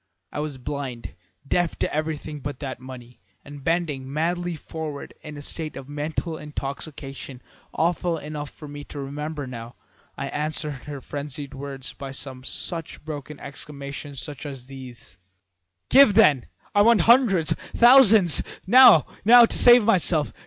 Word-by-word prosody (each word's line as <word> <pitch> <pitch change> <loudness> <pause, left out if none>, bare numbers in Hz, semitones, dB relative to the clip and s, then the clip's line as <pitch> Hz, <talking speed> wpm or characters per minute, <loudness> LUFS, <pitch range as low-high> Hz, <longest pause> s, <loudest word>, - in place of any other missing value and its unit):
I - - -5
was 150 -2 -4
blind, 130 -2 -6 0.3
deaf 175 +1 0
to - - -2
everything 155 -1 -4
but 145 -1 -6
that 135 -3 -6
money, 125 -1 -12 0.3
and 145 -1 -11
bending 150 -5 -2
madly 175 +3 -1
forward 155 -2 -7
in 150 -1 -9
a 145 - -9
state 155 +1 -5
of 135 -1 -9
mental 155 +3 -4
intoxication 140 -2 -7 0.3
awful 170 +1 0
enough 150 -1 -6
for 150 - -12
me 145 0 -8
to 145 - -9
remember 145 +2 -5
now, 120 -2 -9 0.4
I - - -4
answered 150 -2 -3
her 145 -2 -7
frenzied 145 0 -7
words 135 -1 -7
by 140 - -8
some 130 -1 -8
such 165 +3 -5
broken 150 -1 -7
exclamations 140 0 -7
as 140 -3 -8
these: 125 -8 -12 0.7
"'Give, 265 -7 +6
then! 150 - +4 0.3
I 205 - +4
want 225 -2 +5
hundreds 225 -7 +4
thousands 225 - +5 0.2
now, 225 - +8 0.2
now, 235 +3 +8
to - - -1
save 240 -1 +7
myself! 175 -8 +3
150 Hz, 145 wpm, -24 LUFS, 140-165 Hz, 0.7 s, now